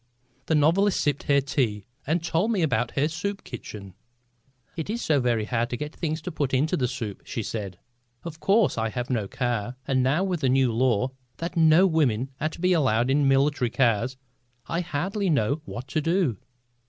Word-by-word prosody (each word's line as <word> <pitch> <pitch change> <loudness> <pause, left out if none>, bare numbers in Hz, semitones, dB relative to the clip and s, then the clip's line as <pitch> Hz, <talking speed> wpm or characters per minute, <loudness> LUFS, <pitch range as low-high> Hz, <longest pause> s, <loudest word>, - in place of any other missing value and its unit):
The 160 - +2
novelist 175 +7 +3
sipped 145 -1 -1
her 140 0 +5
tea 120 -7 -1 0.2
and 160 +3 +1
told 175 +5 +1
me 195 -6 +1
about 120 -6 0
her 140 +2 +3
soup 195 +6 -4
kitchen. 105 -5 -9 0.8
"It 160 +2 -5
is 230 +2 -2
so 150 -3 +2
very 120 -4 +1
hard 120 +1 -1
to 120 - -3
get 150 +4 -6
things 160 -1 -3
to 180 - -4
put 140 -4 -1
into 150 +5 +1
the 125 - 0
soup," 115 -6 -5
she 115 - -4
said. 100 -4 -5 0.5
"Of 160 -2 -7
course 195 - +3
I 110 0 0
have 125 +3 -4
no 110 -5 0
car, 120 0 -2
and 130 -2 +2
now 140 +8 +2
with 180 -4 -1
the 135 - +2
new 130 -2 +3
law 125 +1 +1 0.3
that 170 +2 -5
no 165 +2 +6
women 135 - +1
are 155 - +1
to 160 - -11
be 180 +1 +3
allowed 130 -6 +2
in 140 0 +3
military 135 -2 +2
cars 120 0 +1 0.5
I 170 - -2
hardly 180 +5 -2
know 140 0 +1
what 125 -2 -7
to 155 - 0
do." 165 - +1
140 Hz, 195 wpm, -25 LUFS, 120-165 Hz, 0.8 s, no